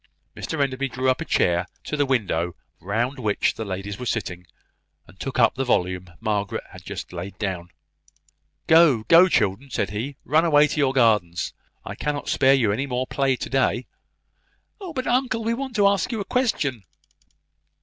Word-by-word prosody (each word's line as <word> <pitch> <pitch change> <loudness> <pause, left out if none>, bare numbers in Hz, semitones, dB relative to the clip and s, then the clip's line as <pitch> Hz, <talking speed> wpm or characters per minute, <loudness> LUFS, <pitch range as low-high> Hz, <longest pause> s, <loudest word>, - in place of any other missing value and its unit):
Mr 160 - -4
Enderby 135 -1 0
drew 130 +1 +1
a 145 +6 -3
chair 90 - +1 0.2
to - - -4
the 145 -1 +1
window 90 -9 0 0.2
round 120 +8 -2
which 105 -4 +1
the 110 - -5
ladies 100 0 -5
were 125 - -5
sitting, 90 -6 -3 0.6
and 95 - -19
took 135 - -4
up 115 -3 +4
the 135 - -2
volume 90 -6 0
Margaret 105 -2 -2
had - - -12
just - - -7
laid 95 +3 -7
down. 95 -4 -4 1.0
"Go, 160 -9 +5
go, 170 - +6
children!" 110 - 0
said 100 -5 -2
he; 120 +7 -4
"run 155 +4 +3
away 150 -3 +5
to - - -4
your 135 -2 +3
gardens! 105 -9 +2 0.3
I - - -5
cannot 145 -1 -3
spare 135 0 +4
you 115 -6 +2
any 130 +7 -1
more 125 0 -1
play 135 0 0
to - - -5
day." 130 -2 +1 0.9
"Oh, 380 -4 -7
but 260 -4 -3
uncle, 245 -2 0
we 230 +1 0
want 265 0 -5
to 205 - +3
ask 200 +3 +1
you 225 - -2
a 200 - -3
question." 155 - 0
130 Hz, 180 wpm, -23 LUFS, 100-150 Hz, 1.0 s, go